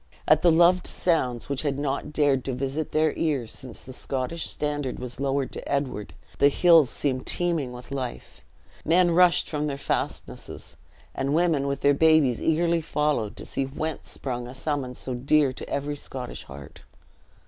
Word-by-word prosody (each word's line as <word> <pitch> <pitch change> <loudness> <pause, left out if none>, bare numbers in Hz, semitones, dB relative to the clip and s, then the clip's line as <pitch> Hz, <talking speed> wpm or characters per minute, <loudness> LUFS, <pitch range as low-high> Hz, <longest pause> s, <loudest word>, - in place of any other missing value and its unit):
At 155 +1 +5
the 175 - +5
loved 175 +2 +4
sounds 130 -9 0
which 140 -2 -2
had 140 -3 -1
not 140 0 -2
dared 145 -4 +2
to 135 - -2
visit 135 +4 -2
their 155 -1 +2
ears 140 -8 -1
since 130 - -8
the 130 - -9
Scottish 135 +6 -3
standard 145 -3 -3
was 125 0 -7
lowered 140 -1 0
to - - -7
Edward, 135 -7 -2 0.2
the 140 - +7
hills 165 -2 +5
seemed 130 -3 -2
teeming 165 -7 0
with 125 +1 -10
life. 130 -3 -5 0.4
Men 175 +2 +4
rushed 175 0 +4
from 150 -1 -2
their 140 -2 -3
fastnesses, 140 - -4 0.4
and 135 +2 -1
women 160 -5 +2
with 140 0 -2
their 145 - +5
babes 155 -5 +4
eagerly 165 +1 +2
followed 150 -8 -1
to - - -8
see 135 - -2
whence 155 +3 -5
sprung 120 -2 -4
a 125 - -9
summons 135 -2 -3
so 130 - -4
dear 135 +2 +2
to - - -9
every 145 +1 -2
Scottish 130 -3 -7
heart. 70 0 -11
140 Hz, 170 wpm, -26 LUFS, 130-155 Hz, 0.4 s, the